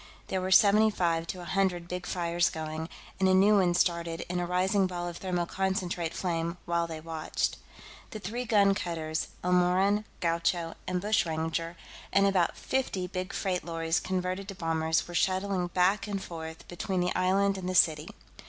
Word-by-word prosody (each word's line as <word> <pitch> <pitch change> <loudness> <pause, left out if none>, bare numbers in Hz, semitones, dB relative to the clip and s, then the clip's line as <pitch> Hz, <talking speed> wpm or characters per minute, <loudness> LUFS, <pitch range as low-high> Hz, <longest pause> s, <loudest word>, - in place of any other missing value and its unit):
There 190 - -1
were 185 - -2
seventy 210 +3 +6
five 170 -4 0
to 180 - -5
a - - -8
hundred 180 -2 0
big 180 0 -5
fires 175 -1 +1
going, 160 +1 -5 0.3
and 190 0 +3
a 185 - +5
new 205 +2 +5
one 175 -2 +2
started 170 -2 0
in 180 0 -1
a 175 - -2
rising 190 +2 +2
ball 175 -1 -4
of 175 -1 -6
thermoconcentrate 180 -1 -1
flame 170 -1 -2
while 170 0 0
they 160 -1 -6
watched. 160 0 -2 0.5
The - - -6
three 215 +5 -4
gun 200 -3 +4
cutters, 160 -4 -3 0.2
Elmoran, 180 +4 +3
Gaucho, 170 0 0
and 180 -1 -1
Bushranger, 165 -4 -1 0.3
and 195 0 +4
about 190 -3 +2
fifty 250 -8 -1
big 185 0 -4
freight 185 -2 -1
lorries 165 -1 -1
converted 185 +1 -2
to 195 - -7
bombers, 160 -2 0
were 175 - -9
shuttling 185 0 +1
back 185 +4 +2
and 200 -1 -2
forth 160 -3 -8
between 180 +1 -3
the 180 - 0
island 195 +2 +2
and 185 -1 -4
the 185 - -2
city. 155 -3 +4
180 Hz, 170 wpm, -29 LUFS, 170-190 Hz, 0.5 s, seventy